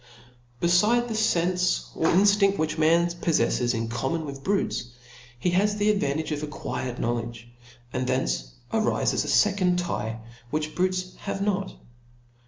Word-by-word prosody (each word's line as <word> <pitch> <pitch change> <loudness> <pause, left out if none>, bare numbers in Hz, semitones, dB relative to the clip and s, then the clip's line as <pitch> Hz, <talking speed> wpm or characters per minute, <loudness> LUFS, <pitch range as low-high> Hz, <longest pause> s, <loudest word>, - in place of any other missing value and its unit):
Befide 210 +8 +3
the - - -2
fenfe 180 -4 +1
or 160 - +1
inftinft 200 +1 +4
which 155 0 -1
man 165 +2 +4
poflefles 165 -8 +1
in 115 0 -2
common 135 +8 -2
with" 140 -1 -8
brutes, 200 -10 0 0.5
he 175 +9 0
has 205 +4 +2
the 210 +1 +3
advantage 155 -6 -1
of 150 -1 -2
acquired 130 -4 -4
knowledge; 115 0 -3 0.5
and 125 0 -1
thence - - -1 0.2
arifes - - +1
a - - -6
fecond 190 -3 +3
tye. 115 -10 -3 0.3
Which 155 +2 -2
brutes 185 0 -1
have 195 0 -4
not. 195 -1 -1
170 Hz, 140 wpm, -26 LUFS, 135-195 Hz, 0.5 s, inftinft